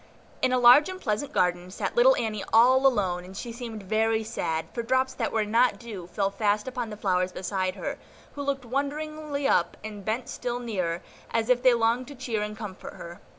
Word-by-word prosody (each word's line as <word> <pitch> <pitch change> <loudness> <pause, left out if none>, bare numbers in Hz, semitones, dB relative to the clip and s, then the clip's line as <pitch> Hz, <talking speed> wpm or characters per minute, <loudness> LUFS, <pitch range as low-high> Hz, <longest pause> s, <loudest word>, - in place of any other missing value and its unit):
In 255 - +2
a 255 - +3
large 250 +6 +7
and 370 0 -6
pleasant 220 - -2
garden 180 0 +1
sat 185 - -4
little - - +6
Annie 215 -3 -2
all 255 +4 +6
alone, 185 -8 0
and 190 +1 -11
she 235 - -5
seemed 230 -3 -7
very 220 +2 +1
sad, 165 -8 -2
for 235 - -2
drops 260 +2 +1
that - - -2
were 220 -1 +1
not 235 +4 +3
dew 210 -7 -8
fell 195 +2 -1
fast 210 +1 0
upon 250 -3 -3
the 210 - -7
flowers 185 -2 +1
beside 185 0 -2
her, - - -5 0.3
who 285 - -6
looked 275 -2 -2
wonderingly 290 +2 -2
up, - - +2
and 210 -2 -7
bent 225 +5 -2
still 245 -1 -3
nearer, 185 -8 -3 0.3
as 230 +1 -1
if 250 -1 +4
they 255 -2 +5
longed 235 +2 +1
to 285 - -9
cheer 245 -4 -3
and 210 0 -4
comfort 205 -4 -8
her. 170 +1 -10
225 Hz, 205 wpm, -27 LUFS, 200-255 Hz, 0.3 s, large